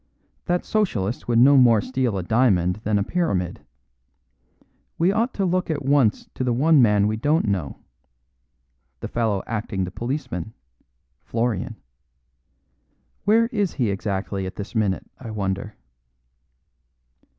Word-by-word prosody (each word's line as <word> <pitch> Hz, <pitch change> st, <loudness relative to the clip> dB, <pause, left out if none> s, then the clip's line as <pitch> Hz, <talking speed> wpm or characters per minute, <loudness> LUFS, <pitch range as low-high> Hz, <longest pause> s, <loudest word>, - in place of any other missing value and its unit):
That 175 Hz, 0 st, 0 dB
Socialist 120 Hz, -, -1 dB
would 120 Hz, -1 st, +2 dB
no 135 Hz, +4 st, +7 dB
more 120 Hz, -4 st, +6 dB
steal 125 Hz, -2 st, -1 dB
a 95 Hz, -, -3 dB
diamond 95 Hz, -4 st, +2 dB
than 105 Hz, -1 st, 0 dB
a 100 Hz, -, +1 dB
Pyramid. 100 Hz, -, -2 dB, 1.3 s
We 175 Hz, +3 st, +3 dB
ought 230 Hz, +5 st, 0 dB
to 195 Hz, -, 0 dB
look 180 Hz, 0 st, 0 dB
at 145 Hz, -4 st, -2 dB
once 135 Hz, -6 st, +2 dB
to -, -, -3 dB
the 125 Hz, -1 st, +1 dB
one 150 Hz, +4 st, +4 dB
man 105 Hz, -3 st, +4 dB
we 110 Hz, +1 st, 0 dB
don't 150 Hz, +7 st, +1 dB
know. 90 Hz, -8 st, -2 dB, 1.2 s
The -, -, -4 dB
fellow 110 Hz, -5 st, -1 dB
acting 105 Hz, -4 st, -3 dB
the 90 Hz, -, -4 dB
policeman 115 Hz, -, -4 dB, 0.7 s
Florian. 115 Hz, -4 st, -2 dB, 1.5 s
Where 225 Hz, +3 st, +4 dB
is 205 Hz, -7 st, -1 dB
he 120 Hz, -7 st, 0 dB
exactly 95 Hz, -1 st, -3 dB
at 95 Hz, -, -8 dB
this 100 Hz, -, -7 dB
minute, 105 Hz, -5 st, 0 dB
I 120 Hz, -, -8 dB
wonder." 100 Hz, 0 st, -3 dB
115 Hz, 135 wpm, -23 LUFS, 100-145 Hz, 1.5 s, no